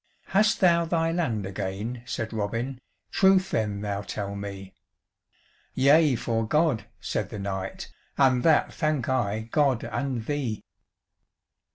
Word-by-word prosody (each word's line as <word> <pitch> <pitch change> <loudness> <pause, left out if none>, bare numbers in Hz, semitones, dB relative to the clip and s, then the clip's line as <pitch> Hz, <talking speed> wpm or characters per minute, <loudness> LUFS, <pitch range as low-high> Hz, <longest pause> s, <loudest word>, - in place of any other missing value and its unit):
"Hast 210 +2 +3
thou 170 -2 +5
thy 165 0 0
land 130 - -1
again?" 100 +5 -4
said 115 -1 -3
Robin, 115 +5 -3 0.3
"Truth 190 0 +4
then 105 -2 -1
thou 100 -1 -2
tell 100 -1 -5
me." 100 -1 -7 1.0
"Yea, 145 +1 +5
for 115 -1 -1
God," 150 -3 +2
said - - -3
the - - -6
knight, 95 -1 -5 0.2
"And 130 -3 +4
that 160 +1 +3
thank 155 -5 -1
I 110 -5 0
God 130 +2 +1
and 130 -5 -3
thee." 135 -7 -2
120 Hz, 130 wpm, -26 LUFS, 105-150 Hz, 1.0 s, thou